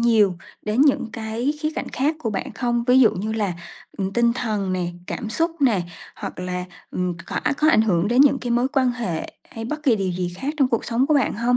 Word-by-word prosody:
nhiều 220 -5 +4 0.3
đến 215 +5 0
những 275 -5 +3
cái 225 +5 -2
khía 310 0 0
cạnh - - -4
khác 295 +4 0
của 225 -7 -2
bạn 200 - -4
không? 240 -1 -1
Ví 250 +1 +5
dụ 235 - +7
như 215 +4 -3
là, 210 -4 0 0.5
ừm, 195 0 -2
tinh 235 0 +3
thần 215 -6 -2
nè, 180 -1 -1 0.2
cảm 225 - -4
xúc 330 +8 +1
nè, 235 -9 +3 0.4
hoặc - - -6
là, 180 0 -3 0.3
ừm, 180 -1 -2
khỏa - - -2 0.2
có 310 - +4
ảnh 220 - +5
hưởng 190 -3 +2
đến 245 +3 +4
những 275 -1 +6
cái 245 - -4
mối 240 +2 +2
quan 270 -3 +2
hệ 225 -10 -3 0.2
hay 225 - -6
bất 300 +6 -4
kỳ 255 -6 +4
điều 190 -3 -1
gì 175 0 -3
khác 285 +8 -3
trong 270 -3 +3
cuộc 230 - 0
sống 245 +3 +1
của 305 - +3
bạn 280 - +2
hông? 240 +3 +2
235 Hz, 240 wpm, -23 LUFS, 200-260 Hz, 0.5 s, dụ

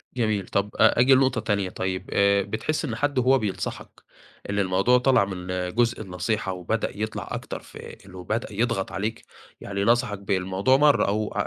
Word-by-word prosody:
جميل. 110 -5 0
طَب، 100 +1 -1
أجي 125 +3 +5
لنقطة 130 -2 +2
تانية، 100 -3 -1
طيب، 95 0 -4
آآ، 100 0 +4
بتحس 110 +10 -2
إن 115 - -3
حد 145 +3 -1
وهو 130 +2 +4
بينصحك 105 -4 -5 0.5
إن 100 - -1
الموضوع 100 +6 +3
طلع 125 -5 +3
من 90 -2 -7 0.3
جزء 120 -1 +1
النصيحة 95 +1 -2
وبدأ 95 +5 -2
يطلع 110 0 -4
أكتر - - -5
في - - -14 0.3
إنه 95 -1 -10
بدأ 110 +2 -3
يضغط 115 -2 -1
عليك، 110 +3 -4 0.4
يعني 100 0 -3
نصحك 110 -2 +1
بالموضوع 95 +5 +1
مرة، 145 0 +4
أو 105 +1 -1
105 Hz, 160 wpm, -25 LUFS, 95-120 Hz, 0.5 s, أجي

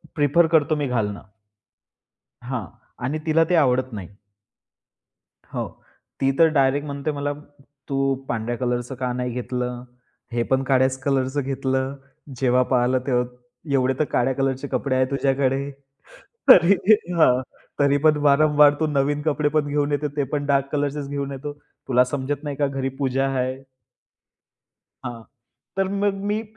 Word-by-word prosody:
Prefer 155 +3 +3
करतो, 155 -1 +3
मी 145 -2 -1
घालणं. 105 -5 -2 1.3
हां, 125 -4 -3 0.4
आणि 145 +5 -1
तीला 165 +1 +4
ते - - +3
आवडत 130 -4 +2
नाही. 95 -5 -6 1.5
हो, - - -2 0.5
ती 135 0 +3
तर, 165 - +7
डायरेक्ट 140 0 +2
म्हणते, 140 +1 -3
"मला 145 0 -2 0.6
तू 135 -1 +1
पांढऱ्या 120 +1 -2
कलरचं 125 +1 -2
का 125 -1 -2
नाही 125 0 -3
घेतलं? 125 0 -4 0.5
हे 120 0 0
पण 130 +2 +1
काळ्याच 130 0 +2
कलरचं 135 0 0
घेतलं. 135 0 -2 0.4
जेव्हा 125 0 +3
पाहिलं 125 0 +3
तेव्हा, 125 -2 +2 0.5
एवढे 130 -1 +2
तर 155 - +3
काळ्या 125 +2 +2
कलरचे 135 0 -1
कपडे 130 0 -1
आहेत 130 0 +3
तुझ्याकडे. 135 0 0 0.8
तरी, 185 -3 +8 0.4
हां 130 -6 +5 0.4
तरी 140 0 +3
पण, 155 -1 +5
वारंवार 150 0 +5
तू 155 - +2
नवीन 145 0 0
कपडे 150 -1 +1
पण 150 - +2
घेऊन 145 0 0
येतो 150 +1 0
ते 145 - +1
पण 145 -1 -1
डार्क 140 -1 +2
कलरचेच 145 -1 -2
घेऊन 140 0 -3
येतो. 140 +2 -6 0.4
तुला 125 -1 +4
समजत 140 +2 -3
नाही 145 -2 -4
का 145 - +1
घरी 135 -1 -2
पूजा 135 -1 0
आहे." 130 0 -1 1.5
हां 120 -1 -6 0.5
तर, 195 -1 +1
मग 200 0 0
मी 215 +2 0
135 Hz, 145 wpm, -23 LUFS, 130-145 Hz, 1.5 s, तरी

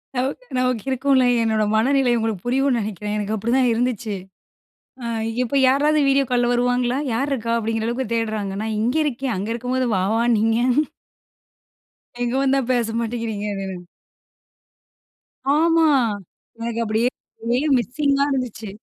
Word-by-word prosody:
நமக்கு 270 - -2
நமக்கு 255 -2 0
இருக்கும்ல. 260 0 +3 0.2
என்னோட 220 -1 +1
மனநிலை 260 +3 +3
உங்களுக்கு 220 -5 -2
புரியும்னு 265 +1 +2
நெனைக்குறன், 210 0 -4
எனக்கு 210 +1 -2
அப்டிதான் 240 +4 +1
இருந்துச்சு. 230 -3 -1 0.9
அ, - - -4 0.4
இப்ப 265 +3 -1
யாராவது 295 +3 +3
வீடியோ 275 0 +4
கால்ல 245 -1 +2
வருவாங்களா? 245 +1 +1 0.2
யாருக்கா 235 -2 -1
அப்டிங்குற 225 0 -1
அளவுக்கு 240 -1 -3
தேடுறாங்க. 215 -3 -2
நான் 220 0 -2
இங்க 245 +7 +1
இருக்கேன். 265 -2 -2
அங்க 205 +4 -3
இருக்கும்போது 250 +1 -1
வா 185 - +1
வானீங்க. 225 -1 +2 1.6
இங்க 240 +2 -1
வந்தா 270 0 +3
பேச 230 -2 0
மாட்டேங்குறீங்க 225 -3 -3 2.1
ஆமா, 330 0 +4 0.7
எனக்கு 230 0 -3
அப்டியே 220 +3 +1 0.3
அப்டியே 245 +6 0
மிஸ்ஸிங்கா 280 +4 +1
இருந்துச்சு. 240 -5 -3
240 Hz, 120 wpm, -22 LUFS, 225-265 Hz, 2.1 s, வீடியோ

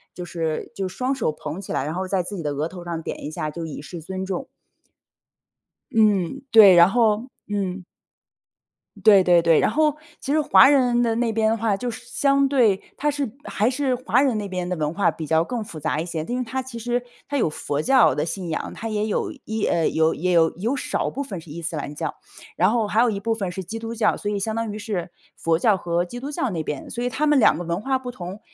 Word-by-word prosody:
就 180 - -6
是 165 +2 -3
就 195 -3 -3
双 255 +8 -2
手 245 -11 -1
捧 155 +5 -6
起 195 - -6
来， - - 0
然 155 +2 -3
后 185 +1 -3
在 185 -2 0
自 200 +2 -6
己 - - -4
的 145 -2 -2
额 150 +4 -2
头 180 -2 -10
上 165 -2 -4
点 - - -5
一 - - -3
下， 155 -1 -4
就 165 +1 -6
以 150 -2 -7
示 165 +2 -8
尊 190 +3 -5
重。 230 +8 -4 1.4
嗯， 205 -5 +2
对， 205 -5 +9
然 170 +1 +7
后 225 +2 +2 0.2
嗯。 195 -2 -3 1.2
对 200 -4 +7
对 175 -1 +5
对， 165 -1 +4
然 - - +2
后 305 +2 +2 0.2
其 275 - -4
实 310 - +3
华 280 -2 +7
人 250 -4 +3
的 230 -1 +1
那 230 -1 0
边 220 0 +2
的 225 - +1
话 220 -2 +1
就 245 +4 -3
是 240 +1 -8
相 275 +2 +2
对 230 -8 +3 0.2
它 295 - 0
是 280 -6 -2
还 215 +2 0
是 260 0 0
华 245 0 +1
人 260 -6 +2
那 205 -1 -3
边 180 -1 -4
的 180 - -1
文 155 0 -2
化 200 - +2
比 160 - -5
较 160 +2 +2
更 235 +2 -4
复 160 -6 -9
杂 155 0 -1
一 165 - -2
些， 160 -3 -4
它 240 - -7
因 250 - 0
为 250 - -2
它 260 +3 -3
其 255 -2 -9
实 240 +1 -1 0.3
它 285 - -4
有 225 - +2
佛 145 -1 -3
教 265 +3 +5
的 150 - -1
信 175 +1 -4
仰， 160 - -3
它 225 - -5
也 215 0 -1
有 210 - -1
一 220 -1 -2
呃， 165 -2 +2
有 160 0 +2
也 180 +3 -1
有 165 -2 +3
有 230 +9 -1
少 - - -2
部 280 - -4
分 195 -10 -7
是 160 - -15
伊 165 +3 -7
斯 165 0 -4
兰 145 0 -5
教， 160 -1 -3 0.4
然 185 +3 +3
后 230 -3 +1
还 220 +3 +2
有 245 - +4
一 200 -2 -2
部 225 +2 0
分 195 -5 -3
是 190 +1 -5
基 225 +6 -6
督 230 +1 -5
教。 225 - +2
所 205 - -4
以， 205 - -1
相 220 +2 -2
当 230 -2 -2
于 210 - -6
是 200 -5 -4 0.3
佛 165 -1 +1
教 205 +3 +3
和 175 -1 -1
基 245 +7 -8
督 275 +3 -6
教 265 -5 -2
那 165 -3 -2
边。 150 -2 -5
所 240 - -4
以 245 - 0
它 290 +6 -1
们 295 -2 +4
2 185 - +5
个 175 - -4
文 170 +3 -2
化 265 +3 0
不 250 -1 -7
同 185 0 -8
205 Hz, 275 characters per minute, -23 LUFS, 170-240 Hz, 1.4 s, 对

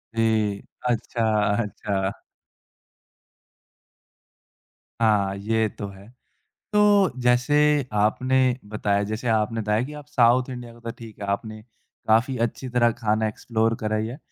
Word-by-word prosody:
जी। 110 -3 +1 0.3
अच्छा, 115 0 -1 0.4
अच्छा। 100 -1 -2 2.9
हाँ, 100 -3 +2
ये 110 +2 0
तो 100 - -7
है। 100 +3 -14 0.6
तो, 205 -2 +5
जैसे 140 +3 +3
आपने 120 +5 +2 0.3
बताया 105 -1 0
जैसे 110 +4 -4
आपने 110 0 +1
बताया 105 +2 +1
कि 150 +3 -7
आप 150 -1 -9
साउथ 125 -1 +3
इंडिया 120 -2 -7
का 120 - -17
तो 115 0 -5
ठीक 115 -3 -12
है। 100 - -4
आपने 110 +2 -3 0.5
काफ़ी 125 +4 +3
अच्छी 130 +2 -6
तरह 120 -1 +3
खाना 110 -1 +1
एक्सप्लोर 115 +1 -1
करा 110 0 -1
ही 110 +1 -1
है। 125 +4 -7
115 Hz, 130 wpm, -24 LUFS, 105-125 Hz, 2.9 s, तो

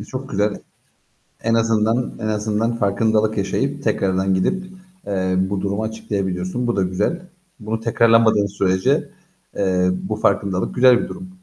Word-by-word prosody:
E, 105 - -7
çok 135 +3 -7
güzel. 105 +1 0 0.8
En 115 0 +1
azından 115 +1 +1
en 110 - -3
azından 110 +2 -1
farkındalık 110 +1 +1
yaşayıp 100 - -1
tekrardan 95 0 +1
gidip, 185 - 0 0.4
eee, 95 -2 0
bu 95 +1 0
durumu 100 +2 -2
açıklayabiliyorsun. 100 0 -3
Bu 120 - 0
da 100 - +1
güzel. 95 - -1 0.4
Bunu 110 +1 -3
tekrarlamadığın 115 -2 +3
sürece, 100 - +1 0.5
eee, 90 -2 +2
bu 100 +3 -4
farkındalık 100 -3 0
güzel 125 -1 +6
bir - - -5
durum. 185 0 -8
105 Hz, 140 wpm, -20 LUFS, 95-115 Hz, 0.8 s, güzel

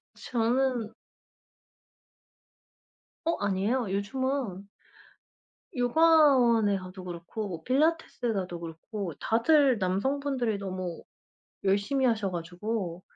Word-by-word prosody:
저는 240 -1 0 2.4
어 335 - +2
아니에요. 205 +4 0
요즘은 205 -1 -2 1.1
요가원에 250 -6 +4
가도 185 0 -9
그렇고 175 0 -6
필라테스 275 -3 +1
가도 185 -4 -3
그렇고 170 +3 -6
다들 265 +3 +3
남성분들이 245 +4 0
너무 185 -3 -5 0.6
열심히 205 +8 +2
하셔 215 -5 +1
가지고 180 +1 -4
220 Hz, 205 characters per minute, -28 LUFS, 185-260 Hz, 2.4 s, 요가원에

